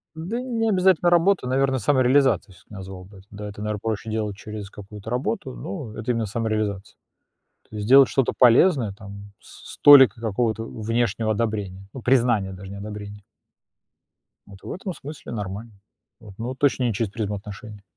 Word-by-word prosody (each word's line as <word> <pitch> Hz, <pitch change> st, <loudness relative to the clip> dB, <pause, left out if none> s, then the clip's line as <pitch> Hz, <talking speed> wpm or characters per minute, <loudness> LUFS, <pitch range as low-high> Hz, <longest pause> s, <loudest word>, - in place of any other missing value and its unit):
Да 180 Hz, +10 st, -4 dB
не 230 Hz, -3 st, -1 dB
обязательно 185 Hz, -3 st, +3 dB
работа, 175 Hz, -3 st, +3 dB
наверно, 130 Hz, +1 st, +1 dB
самореализацией 130 Hz, -3 st, +2 dB
всё-таки 90 Hz, +4 st, -17 dB
назвал 95 Hz, -1 st, -9 dB
бы. 95 Hz, 0 st, -15 dB
Да, 105 Hz, 0 st, -7 dB
это, 105 Hz, +1 st, -9 dB
наверно, 105 Hz, -1 st, -2 dB
проще 110 Hz, 0 st, -3 dB
делать 105 Hz, -2 st, -2 dB
через 105 Hz, -1 st, -8 dB
какую-то 105 Hz, +1 st, -11 dB
работу, 125 Hz, +1 st, -2 dB
но 130 Hz, -, -7 dB
это 115 Hz, +3 st, -3 dB
именно 115 Hz, -2 st, 0 dB
самореализация. 110 Hz, -2 st, -3 dB, 0.7 s
То -, -, -11 dB
есть 105 Hz, 0 st, -4 dB
делать 135 Hz, +1 st, +7 dB
что-то 135 Hz, -3 st, +1 dB
полезное, 125 Hz, -, +5 dB
там 100 Hz, 0 st, -11 dB
с -, -, -13 dB
с -, -, -12 dB
толикой 135 Hz, -6 st, +8 dB
какого-то 110 Hz, 0 st, -1 dB
внешнего 115 Hz, -1 st, -1 dB
одобрения, 105 Hz, -4 st, -3 dB
ну 130 Hz, -, -8 dB
признания 115 Hz, -6 st, +2 dB
даже, 95 Hz, +1 st, -10 dB
не 100 Hz, -, -7 dB
одобрения. 105 Hz, 0 st, -8 dB, 1.2 s
Вот 100 Hz, -1 st, -15 dB
в -, -, -7 dB
этом 190 Hz, +1 st, -5 dB
смысле 145 Hz, -4 st, -9 dB
нормально. 105 Hz, +1 st, -6 dB, 0.5 s
Вот. 105 Hz, -4 st, -13 dB
Но 115 Hz, -, -4 dB
вот 130 Hz, 0 st, -6 dB
точно 135 Hz, -3 st, +2 dB
не 115 Hz, -4 st, 0 dB
через 110 Hz, -1 st, -2 dB
призму 105 Hz, -2 st, -3 dB
отношений. 105 Hz, +1 st, -10 dB
110 Hz, 170 wpm, -23 LUFS, 105-130 Hz, 1.2 s, толикой